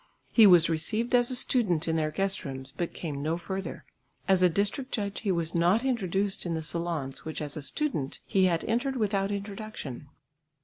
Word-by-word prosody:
He 225 -3 +8
was 175 -3 +7
received 215 +10 -1
as 245 -1 +5
a 255 - +1
student 195 - +1
in 160 - +1
their 155 -1 +1
guest 195 +5 -1
rooms 135 -2 -7
but 175 - -2
came 145 -5 -4
no 160 +3 -1
further; 190 +2 -4 0.4
as 190 -2 +4
a 180 - +6
district 205 - -1
judge 200 -2 -3
he 205 - 0
was 170 -2 0
not 180 +8 +3
introduced 200 -5 0
in 170 -2 -2
the 160 - -3
salons 155 -4 -3
which 160 -1 -5
as 150 -2 -3
a 155 - -5
student 145 - -2
he 190 -1 +3
had 170 -3 +1
entered 245 +4 0
without 200 -4 0
introduction. 200 - -6
185 Hz, 190 wpm, -28 LUFS, 160-210 Hz, 0.4 s, He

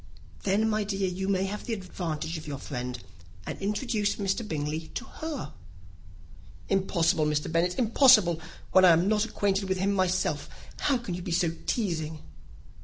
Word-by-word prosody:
"Then, 205 +3 +2
my 215 -1 +1
dear, 195 -1 -1
you 185 +1 -3
may 190 -1 +2
have 205 +2 -5
the 235 - -2
advantage 170 -4 -4
of 155 -1 -7
your 140 -2 -4
friend, 125 -2 -5 0.5
and - - -4
introduce 205 0 0
Mr. 195 +1 -1
Bingley 155 0 -3
to 255 - -3
her." 305 - -6 1.2
"Impossible, 170 -5 +2
Mr. 150 +1 -1
Bennet, 175 +2 +1
impossible, 220 - +5 0.3
when 185 - +6
I 180 -2 +8
am 170 +3 +3
not 210 0 +2
acquainted 200 -3 0
with 190 - +1
him 195 +2 +1
myself; 185 -1 0 0.3
how 275 - +2
can 235 -7 -5
you 180 - -4
be 175 - -5
so 170 -1 +2 0.2
teasing?" 160 -8 -1
190 Hz, 165 wpm, -28 LUFS, 165-205 Hz, 1.2 s, I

